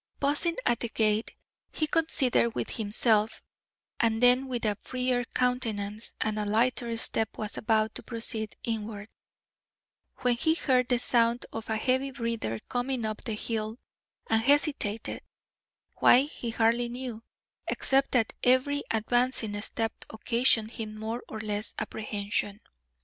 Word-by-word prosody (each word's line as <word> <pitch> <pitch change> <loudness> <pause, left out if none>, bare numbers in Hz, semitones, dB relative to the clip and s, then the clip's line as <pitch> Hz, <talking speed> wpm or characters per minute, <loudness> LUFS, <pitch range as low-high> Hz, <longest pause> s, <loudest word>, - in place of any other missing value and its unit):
Pausing 290 +4 +1
at 235 - +2
the 235 - -3
gate, 215 0 0 0.4
he 310 - 0
considered 290 -7 +1
with - - -3
himself, 220 0 +1 0.6
and 225 -1 +2
then 250 +2 +5
with 245 -3 -3
a 210 -1 +1
freer 250 -1 -1
countenance 225 -5 -1
and 215 -1 -1
a - - 0
lighter 235 +2 +1
step 225 -1 -1
was 215 -1 -5
about 220 0 +1
to - - -5
proceed 225 -2 0
inward, 215 -2 -4 1.1
when 250 -1 +3
he 320 +7 +2
heard 255 -6 +2
the 245 - +2
sound 235 0 +3
of 225 0 -6
a 220 - 0
heavy 260 +4 +1
breather 230 - -3
coming 245 -1 -2
up 215 0 -3
the 225 - -3
hill, 220 0 -2 0.5
and 225 0 +2
hesitated 275 -5 +1 0.8
why 250 - +6
he 275 -4 -5
hardly 230 +1 +1
knew, 245 -2 -6 0.5
except 270 0 +2
that 230 -4 +2
every 260 +3 +3
advancing 225 -1 0
step 225 +1 -1 0.2
occasioned 225 0 +1
him 215 -2 -6
more 225 +3 -4
or 220 - -6
less 210 0 -1
apprehension. 205 -1 -3
230 Hz, 140 wpm, -28 LUFS, 220-250 Hz, 1.1 s, why